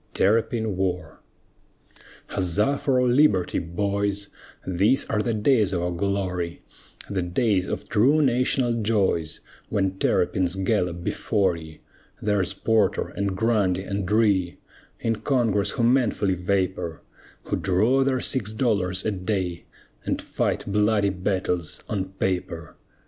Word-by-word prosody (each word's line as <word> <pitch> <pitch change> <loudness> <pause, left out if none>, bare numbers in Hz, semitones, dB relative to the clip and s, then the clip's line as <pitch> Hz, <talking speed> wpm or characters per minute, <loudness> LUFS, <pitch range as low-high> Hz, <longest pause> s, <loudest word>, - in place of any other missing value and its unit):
TERRAPIN 110 0 +1
WAR 90 -4 -3 1.1
Huzza 105 +10 0
for 130 -3 +1
our 125 - +2
liberty, 120 -8 +3
boys, 100 +3 -2 0.4
These 100 +9 +2
are 105 - +1
the 115 0 -1
days 105 -2 +2
of 85 -1 -1
our 90 - -1
glory 90 -2 -2 0.5
The 100 -2 -2
days 90 +2 +1
of - - -4
true 130 +8 +3
national 125 -3 +1
joys, 95 -7 0 0.3
When 95 -2 -1
terrapins 90 0 +1
gallop 90 -3 -1
before 95 -1 0
ye! 80 -1 -11 0.4
There's 100 -4 +1
Porter 110 -2 +1
and 100 -2 -3
Grundy 100 -5 +1
and 100 -1 -3
Rhea, 100 -5 +2 0.4
In 115 -1 -1
Congress 110 -4 +1
who 120 - -1
manfully 115 -5 +2
vapor, 90 -2 -2 0.4
Who - - -2
draw 110 +9 +2
their 130 -1 0
six 110 -5 -1
dollars 100 -6 0
a 110 - +1
day, 90 -3 -3 0.4
And - - -1
fight - - -2
bloody 105 0 +2
battles 90 -3 -2
on 100 -3 -2
paper! 90 -4 -3
100 Hz, 125 wpm, -24 LUFS, 90-110 Hz, 1.1 s, liberty